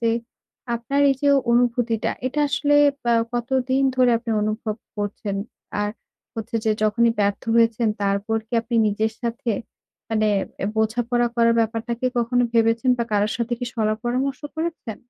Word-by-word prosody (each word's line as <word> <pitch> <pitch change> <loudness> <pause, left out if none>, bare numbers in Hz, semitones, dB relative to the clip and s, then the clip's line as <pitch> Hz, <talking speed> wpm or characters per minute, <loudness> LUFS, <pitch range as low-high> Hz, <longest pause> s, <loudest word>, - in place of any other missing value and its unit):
যে 230 -1 +2 0.6
আপনার 235 +5 -1
এই - - +2
যে 285 - +4 0.2
অনুভূতিটা 240 -2 +1 0.2
এটা 295 +4 -1
আসলে 290 +1 +1 0.3
বা 235 - +3 0.2
কতদিন 260 +2 0
ধরে 250 -1 +5
আপনি 230 -1 -6
অনুভব 215 0 -2 0.2
করছেন? 205 -1 -3 0.4
আর 205 - 0 0.4
হচ্ছে 225 0 -4
যে 220 - +2
যখনই 230 +2 +3
ব্যর্থ 200 0 0
হয়েছেন 230 0 +3
তারপর 200 +3 0
কি 230 - -52
আপনি 235 +1 -5
নিজের 220 +2 0
সাথে 235 0 -2 0.6
মানে 215 -1 +1 0.3
অ্যা - - -2
বোঝাপড়া 240 +2 +1
করার 230 0 +4
ব্যাপারটাকে 230 +2 -1
কখনো 245 +1 +2
ভেবেছেন 230 +2 +3
বা 235 - +1
কারোর 205 +1 +2
সাথে 235 0 -2
কি 245 - -3
শলা-পরামর্শ 240 +5 -1 0.2
করেছেন? 320 -9 -4
230 Hz, 145 wpm, -23 LUFS, 220-245 Hz, 0.6 s, ধরে